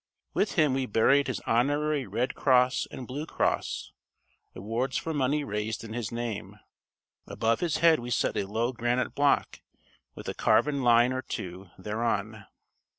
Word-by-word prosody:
With 205 - 0
him 150 -5 +3
we 130 -1 -1
buried 135 +7 +3
his 130 - -3
honorary 145 +3 +1
Red 125 +2 -1
Cross 125 -2 +3
and 130 - -8
Blue 145 +6 -5
Cross - - -1 0.6
awards 115 +7 -2
for 165 - -3
money 145 +1 +1
raised 105 -2 -3
in 110 -1 -8
his 115 -3 -4
name. 115 -3 -5 0.7
Above 115 0 0
his 170 -3 0
head 165 -1 +5
we 120 0 -6
set 120 - 0
a 100 - -1
low 115 +5 -1
granite 120 +1 -1
block, 145 0 +1 0.5
with - - -9
a - - -2
carven 140 -2 +2
line 120 0 +4
or 130 - -2
two 95 -4 -7
thereon. 105 0 -2
120 Hz, 155 wpm, -28 LUFS, 110-140 Hz, 0.7 s, head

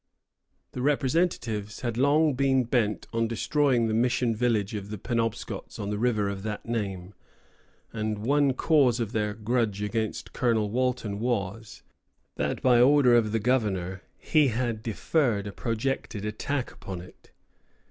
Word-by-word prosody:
The 125 - -5
representatives 130 - 0
had 120 -3 -2
long 145 +4 +3
been 130 0 +2
bent 115 -3 0
on 115 0 +1
destroying 125 +2 +1
the 110 - 0
mission 120 0 +1
village 110 -3 0
of 100 -1 -5
the 105 - -5
Penobscots 115 +1 -3
on 100 0 -4
the 105 - -2
river 110 -4 +1
of 100 -1 -4
that 105 0 -5
name; 100 -5 -3 0.8
and 110 0 -2
one 140 +5 +2
cause 130 -4 +3
of 115 -3 -2
their 105 -2 -1
grudge 110 -2 0
against 110 +1 -3
Colonel 110 -4 +1
Walton 125 -4 -1
was 110 -2 -3 0.5
that, - - -2
by 125 -2 +5
order 135 -1 +6
of 115 -3 +3
the 115 - +1
governor, 100 -6 0 0.2
he 155 -3 +3
had 120 -2 -1
deferred 115 -1 0
a 100 - -5
projected 115 -1 -3
attack 125 +5 -3
upon 95 -2 -7
it. 90 - -16
115 Hz, 145 wpm, -27 LUFS, 105-125 Hz, 0.8 s, order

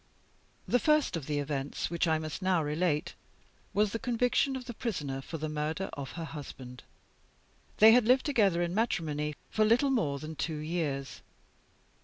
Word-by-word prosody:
The 245 - +3
first 300 - +2
of 155 -5 -5
the 150 - -1
events 145 +1 -3
which 170 0 +1
I 160 -1 +3
must 155 -1 -5
now 185 -3 +2
relate 150 +1 0 0.6
was 210 0 +2
the 230 - -3
conviction 250 +3 +1
of 255 -1 -6
The 240 - -6
Prisoner 150 - -3
for 160 - -6
the 155 0 -3
murder 155 +5 -3
of 140 -2 -6
her 170 - -5
husband. 130 -5 -9 1.0
They 220 +1 +9
had 240 0 +5
lived 255 +1 +4
together 200 - +3
in 175 0 -2
matrimony 155 -9 -1 0.2
for 215 - +2
little 240 +6 +4
more 155 - +1
than 155 +2 -7
two 155 0 -3
years. 150 -3 -3
165 Hz, 170 wpm, -30 LUFS, 150-225 Hz, 1.0 s, They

